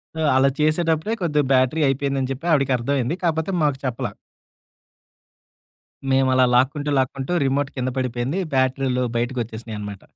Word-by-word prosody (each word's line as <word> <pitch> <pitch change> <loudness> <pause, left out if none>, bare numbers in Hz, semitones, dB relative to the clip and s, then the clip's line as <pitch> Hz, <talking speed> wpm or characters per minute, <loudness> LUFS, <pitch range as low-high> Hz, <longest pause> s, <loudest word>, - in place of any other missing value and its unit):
So, - - -5 0.2
అలా 135 +1 +4
చేసేటప్పుడే 160 +5 +1
కొద్దిగా 150 -4 +1
బ్యాటరీ 130 +5 +2
అయిపోయిందని 135 -1 -1
చెప్పి, 135 +5 -6
ఆవిడకి 135 -4 +3
అర్థమైంది. 135 +4 -1
కాపోతే 160 +1 0
మాకు 145 -3 +1
చెప్పలా. 125 -3 -2 2.0
మేమలా 130 -1 +4
లాక్కుంటూ, 140 +4 +1
లాక్కుంటూ 135 +3 -2
రిమోట్ 135 +1 0
కింద 125 - -1
పడిపోయింది 125 +7 -2
బ్యాటరీలు 130 -1 +1
బయటికోచ్చేసినాయనమాట. 115 -4 -4
135 Hz, 120 wpm, -22 LUFS, 125-150 Hz, 2.0 s, అలా